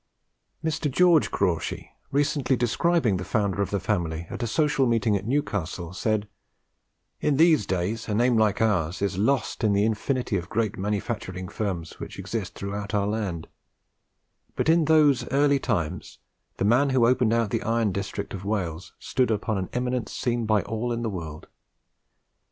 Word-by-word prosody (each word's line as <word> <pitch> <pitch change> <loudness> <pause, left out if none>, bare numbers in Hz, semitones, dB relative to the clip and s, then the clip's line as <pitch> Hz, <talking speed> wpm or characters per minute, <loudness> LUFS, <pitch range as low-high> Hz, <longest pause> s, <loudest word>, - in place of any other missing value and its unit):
Mr. 155 -1 0
George 170 +2 +4
Crawshay, 90 -5 -1 0.2
recently 140 -1 +1
describing 125 - +1
the 90 - -4
founder 100 +1 0
of 100 - -1
the 100 - -1
family 85 -4 -2
at - - -5
a 120 - -1
social 145 +1 +2
meeting 115 -2 +2
at 100 +1 -3
Newcastle, 95 - -2
said, 105 +1 -1 0.9
"In 145 -2 +1
these 155 - +4
days 95 +6 -2
a 105 - 0
name 120 +2 +3
like 110 -1 +2
ours 90 -4 0
is 100 -1 -1
lost 120 +1 0
in 105 -2 +3
the 100 +1 +3
infinity 115 +1 -1
of 85 +1 -6
great 110 -2 0
manufacturing 100 -2 -3
firms 95 -5 -4
which - - -8
exist - - -4
through 100 0 -5
out 105 0 -4
the 100 -1 +2
land; 100 -6 -3 1.1
but - - 0
in 165 -1 +4
those 145 -6 +4
early 140 +1 +3
times 85 -10 -2 0.4
the - - 0
man 125 +7 +4
who 130 -3 +3
opened 125 -2 +3
out 115 -3 +1
the - - 0
iron 115 -1 +1
district 100 +1 -4
of 95 -1 -6
Wales 95 -5 -3
stood 130 -2 0
upon 110 -1 0
an 95 - -4
eminence 125 -1 -2
seen 120 -2 -1
by 105 -2 +3
all 115 +1 -2
the 115 -1 -2
world. 80 -5 -7
110 Hz, 170 wpm, -25 LUFS, 100-125 Hz, 1.1 s, George